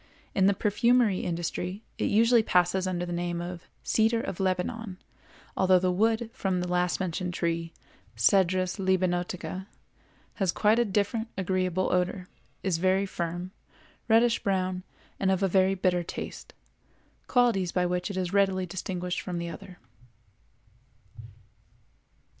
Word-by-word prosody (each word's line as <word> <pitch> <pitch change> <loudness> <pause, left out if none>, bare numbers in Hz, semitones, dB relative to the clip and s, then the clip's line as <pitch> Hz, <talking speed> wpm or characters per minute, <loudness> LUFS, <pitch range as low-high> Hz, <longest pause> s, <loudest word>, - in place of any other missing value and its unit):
In 190 -1 +3
the 200 - +3
perfumery 225 0 +2
industry 180 +4 -3 0.2
it - - +1
usually 230 +2 +5
passes 180 -1 +2
under 175 -1 -2
the 175 - -4
name 175 0 -2
of 175 0 -5
the - - -27 0.2
"cedar 225 +1 +2
of 190 - -5
Lebanon," 190 +2 -2 0.6
although 190 -1 +4
the 180 0 +1
wood 225 +4 +1
from 190 -2 -1
the 180 - -2
last 180 0 0
mentioned 180 -1 -3
tree 165 0 -1 0.5
(Cedrus 185 -1 +3
libanotica) 185 0 -1 0.7
has 195 -5 +1
quite 215 +4 +3
a 240 - +3
different 215 +3 0
agreeable 185 -1 0
odor, 180 0 0 0.4
is 180 -4 0
very 190 +2 +2
firm, 175 -1 -4 0.6
reddish 230 +1 +4
brown, 185 -2 -1 0.4
and 190 - +1
of 190 0 +1
a - - +4
very 190 +1 +3
bitter 180 -1 +1
taste—qualities 195 +3 -3
by 180 -1 +1
which 180 +1 -1
it 200 - -5
is 185 0 -2
readily 190 -2 +2
distinguished 180 0 -4
from 180 -1 -4
the 170 0 -3
other. 185 +1 -10
185 Hz, 135 wpm, -28 LUFS, 180-200 Hz, 0.7 s, usually